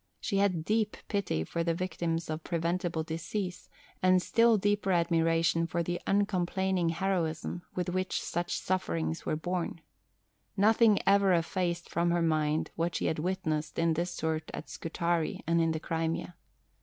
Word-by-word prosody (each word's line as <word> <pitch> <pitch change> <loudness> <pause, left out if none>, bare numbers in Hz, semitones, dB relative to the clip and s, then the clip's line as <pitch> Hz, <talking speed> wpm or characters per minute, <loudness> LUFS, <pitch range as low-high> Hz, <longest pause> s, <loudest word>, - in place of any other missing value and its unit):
She 200 - -1
had 185 -5 +1
deep 215 +1 +1
pity 200 - 0
for 170 - -2
the 165 -1 0
victims 170 -2 -2
of 155 +1 -4
preventable 170 -1 -1
disease, 175 +3 -4 0.3
and 185 0 +5
still 230 +4 +4
deeper 205 -1 +1
admiration 165 -1 +2
for 170 +1 -1
the 175 +1 -3
uncomplaining 190 -2 +1
heroism 170 -2 -1
with 180 0 -1
which 185 +1 -1
such 175 +1 -2
sufferings 85 - -2
were - - +1
borne. 175 +1 -3 0.8
Nothing 215 +1 +5
ever 200 -1 +5
effaced 175 +1 0
from 170 0 0
her 170 0 +2
mind 155 -1 +1
what 170 +1 -1
she - - -1
had 155 - 0
witnessed 160 -3 -2
in 165 0 +3
this 170 +3 -1
sort 160 -2 -2
at 155 - -8
Scutari 170 0 -1
and 170 +1 +2
in 165 - +2
the 160 - -2
Crimea. 165 +2 -2
170 Hz, 155 wpm, -30 LUFS, 165-185 Hz, 0.8 s, and